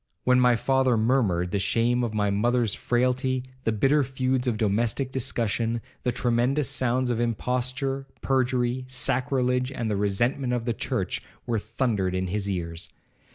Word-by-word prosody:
When 125 Hz, 0 st, +4 dB
my 125 Hz, -1 st, +5 dB
father 130 Hz, 0 st, +2 dB
murmured, 110 Hz, -7 st, +1 dB
the 100 Hz, -, 0 dB
shame 120 Hz, +5 st, +1 dB
of 115 Hz, -, -1 dB
my 105 Hz, -2 st, 0 dB
mother's 115 Hz, +2 st, +1 dB
frailty, 125 Hz, +1 st, 0 dB, 0.2 s
the 115 Hz, -, +2 dB
bitter 135 Hz, +7 st, +3 dB
feuds 130 Hz, 0 st, -1 dB
of 115 Hz, -3 st, +1 dB
domestic 115 Hz, +5 st, 0 dB
discussion, 115 Hz, -2 st, -1 dB, 0.2 s
the 125 Hz, -, 0 dB
tremendous 125 Hz, +4 st, +1 dB
sounds 125 Hz, +1 st, +1 dB
of 115 Hz, -, -1 dB
imposture, 125 Hz, +3 st, -1 dB, 0.2 s
perjury, 130 Hz, -1 st, +1 dB
sacrilege, 125 Hz, 0 st, 0 dB
and 115 Hz, -4 st, -3 dB
the -, -, +1 dB
resentment 120 Hz, +6 st, 0 dB
of 120 Hz, -2 st, -1 dB
the 120 Hz, -, 0 dB
church, -, -, -2 dB, 0.2 s
were 115 Hz, -2 st, 0 dB
thundered 105 Hz, -4 st, -1 dB
in 95 Hz, 0 st, -1 dB
his 100 Hz, +1 st, -2 dB
ears. 85 Hz, -3 st, -4 dB
120 Hz, 155 wpm, -26 LUFS, 110-130 Hz, 0.2 s, my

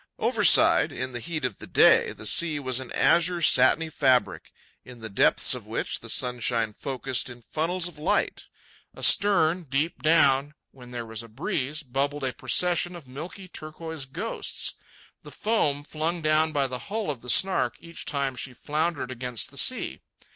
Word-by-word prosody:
Overside, -, -, +4 dB
in 130 Hz, 0 st, -5 dB
the 120 Hz, -, -6 dB
heat 155 Hz, +1 st, -4 dB
of 105 Hz, -, -4 dB
the -, -, -10 dB
day, -, -, +4 dB
the -, -, -11 dB
sea 165 Hz, -3 st, +2 dB
was 130 Hz, -2 st, -2 dB
an 130 Hz, -2 st, -9 dB
azure 175 Hz, +1 st, +2 dB
satiny 155 Hz, +4 st, +4 dB
fabric, 130 Hz, -5 st, +1 dB, 0.3 s
in 125 Hz, -1 st, -13 dB
the 110 Hz, -1 st, -8 dB
depths 100 Hz, -, +3 dB
of -, -, -8 dB
which -, -, -3 dB
the -, -, -9 dB
sunshine 120 Hz, -3 st, -1 dB
focussed 130 Hz, +1 st, -3 dB
in 120 Hz, -1 st, -12 dB
funnels 170 Hz, +6 st, -2 dB
of 170 Hz, -4 st, -12 dB
light. 155 Hz, -, -1 dB, 0.5 s
Astern, 185 Hz, -4 st, +3 dB
deep 145 Hz, +5 st, -1 dB
down, 145 Hz, -2 st, +3 dB, 0.2 s
when 125 Hz, -2 st, -14 dB
there 120 Hz, -1 st, -6 dB
was 110 Hz, 0 st, -5 dB
a 115 Hz, -, -11 dB
breeze, 140 Hz, +5 st, -3 dB
bubbled 140 Hz, +2 st, -3 dB
a 130 Hz, -1 st, -2 dB
procession 175 Hz, +8 st, +2 dB
of 165 Hz, -6 st, -12 dB
milky 165 Hz, +8 st, -9 dB
turquoise 155 Hz, -2 st, -7 dB
ghosts—the 210 Hz, +12 st, -6 dB
foam 150 Hz, -11 st, -1 dB
flung 160 Hz, +3 st, -3 dB
down 155 Hz, +1 st, +2 dB
by 145 Hz, -2 st, +1 dB
the 130 Hz, -1 st, -4 dB
hull 215 Hz, -5 st, -2 dB
of 130 Hz, -5 st, -9 dB
the 125 Hz, -, -7 dB
Snark 190 Hz, +8 st, +4 dB
each 170 Hz, 0 st, -10 dB
time 140 Hz, -3 st, -2 dB
she 130 Hz, +1 st, -6 dB
floundered 155 Hz, +1 st, -3 dB
against 125 Hz, -2 st, -2 dB
a -, -, -8 dB
sea. -, -, +2 dB
145 Hz, 170 wpm, -25 LUFS, 125-165 Hz, 0.5 s, Overside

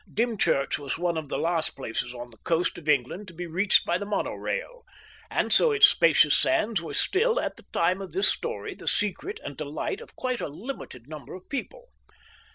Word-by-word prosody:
Dymchurch 220 Hz, -, +1 dB
was 140 Hz, -2 st, -3 dB
one 175 Hz, 0 st, 0 dB
of 155 Hz, -3 st, -4 dB
the -, -, -2 dB
last 165 Hz, -1 st, 0 dB
places 125 Hz, -1 st, -3 dB
on 120 Hz, 0 st, -8 dB
the 110 Hz, -, -18 dB
coast 170 Hz, +1 st, 0 dB
of 155 Hz, -2 st, -6 dB
England 150 Hz, +8 st, +1 dB
to 175 Hz, -, -11 dB
be 175 Hz, +2 st, -5 dB
reached 180 Hz, +4 st, +3 dB
by 175 Hz, +1 st, +1 dB
the 205 Hz, -, -4 dB
mono 205 Hz, -, -1 dB
rail, -, -, -4 dB, 0.5 s
and -, -, +1 dB
so 485 Hz, -, +5 dB
its 430 Hz, -, +8 dB
spacious -, -, +5 dB
sands 225 Hz, -, +2 dB
were 165 Hz, -, -6 dB
still, 460 Hz, +5 st, +2 dB
at -, -, -2 dB
the -, -, -16 dB
time 180 Hz, +3 st, +1 dB
of 195 Hz, -, -7 dB
this 385 Hz, -, +2 dB
story, -, -, -2 dB
the -, -, -12 dB
secret 205 Hz, -3 st, 0 dB
and 140 Hz, -, -6 dB
delight 155 Hz, -, -3 dB
of 475 Hz, -, -14 dB
quite 255 Hz, -2 st, -2 dB
a -, -, -2 dB
limited 150 Hz, -, -8 dB
number 150 Hz, -2 st, -9 dB
of 185 Hz, 0 st, -12 dB
people. -, -, -5 dB
180 Hz, 205 wpm, -27 LUFS, 150-250 Hz, 0.5 s, its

